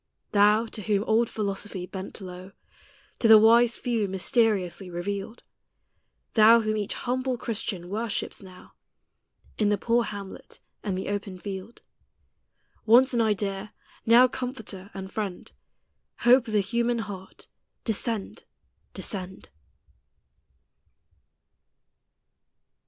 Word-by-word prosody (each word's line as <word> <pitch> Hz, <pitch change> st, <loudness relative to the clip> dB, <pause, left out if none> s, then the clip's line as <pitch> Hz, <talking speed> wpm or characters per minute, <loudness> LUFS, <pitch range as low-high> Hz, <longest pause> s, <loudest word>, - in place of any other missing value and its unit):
Thou, 210 Hz, +2 st, +4 dB
to 220 Hz, -, -7 dB
whom 205 Hz, -1 st, 0 dB
old 225 Hz, +1 st, +2 dB
Philosophy 200 Hz, -3 st, -3 dB
bent 190 Hz, +3 st, -8 dB
low, 185 Hz, +1 st, -9 dB, 0.7 s
To 230 Hz, -, +3 dB
the 220 Hz, -1 st, +10 dB
wise 230 Hz, +2 st, +5 dB
few 230 Hz, -4 st, -1 dB
mysteriously 190 Hz, -1 st, +1 dB
revealed; 195 Hz, +5 st, -5 dB, 0.9 s
Thou, 225 Hz, +1 st, +7 dB
whom 215 Hz, 0 st, -1 dB
each 210 Hz, -2 st, -3 dB
humble 255 Hz, 0 st, -2 dB
Christian 205 Hz, -6 st, -3 dB
worships 220 Hz, +3 st, -3 dB
now, 185 Hz, -2 st, -14 dB, 0.9 s
In 210 Hz, -2 st, +3 dB
the 205 Hz, -, +2 dB
poor 235 Hz, +3 st, +1 dB
hamlet 200 Hz, -2 st, -8 dB, 0.2 s
and 195 Hz, -4 st, -3 dB
the 190 Hz, -, -4 dB
open 200 Hz, -2 st, -4 dB
field: 195 Hz, +3 st, -8 dB, 1.0 s
Once 250 Hz, +4 st, +5 dB
an 235 Hz, -, +2 dB
idea, 205 Hz, -2 st, -1 dB, 0.3 s
now 240 Hz, +3 st, +6 dB
Comforter 225 Hz, -7 st, -6 dB
and 190 Hz, 0 st, -7 dB
Friend, 205 Hz, -5 st, -4 dB, 0.7 s
Hope 245 Hz, +1 st, +5 dB
of 220 Hz, -, -5 dB
the 210 Hz, -, +4 dB
human 235 Hz, +4 st, 0 dB
heart, 200 Hz, -4 st, -8 dB, 0.4 s
descend, 220 Hz, -1 st, -3 dB, 0.5 s
descend! 190 Hz, -2 st, -4 dB
210 Hz, 110 wpm, -26 LUFS, 195-230 Hz, 1.0 s, the